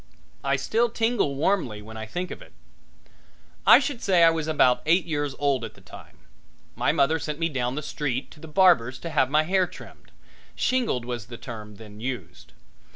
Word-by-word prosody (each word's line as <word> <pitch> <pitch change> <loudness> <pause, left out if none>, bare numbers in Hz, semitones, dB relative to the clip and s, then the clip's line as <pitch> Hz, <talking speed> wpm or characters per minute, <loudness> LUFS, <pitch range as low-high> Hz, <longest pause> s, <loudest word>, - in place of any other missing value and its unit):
I 140 0 +1
still 225 - +1
tingle 225 - 0
warmly 145 - 0
when 110 +1 -11
I 110 0 -6
think 180 +10 -4
of - - -8
it. - - -15 1.1
I - - +10
should 270 -6 -2
say 180 -3 +4
I 165 - +7
was 160 -1 -3
about 130 -5 +3
eight 170 +3 +4
years 145 -4 -2
old 140 -4 +1
at 110 -2 -7
the - - -17
time. 90 - -14 0.6
My - - +1
mother 160 +4 +2
sent 150 0 -4
me 165 +1 0
down 125 -3 -2
the 150 - -4
street 140 -3 -3
to 155 - -15
the 160 - -10
barber's 150 -8 +4
to 170 - -7
have 135 -4 +2
my 155 +2 +3
hair 185 +2 +2
trimmed - - -14 0.4
shingled 235 - 0
was 120 -3 -5
the 120 0 -9
term 110 -4 -9
then 105 0 -13
used. 125 +2 -6
145 Hz, 195 wpm, -25 LUFS, 120-170 Hz, 1.1 s, I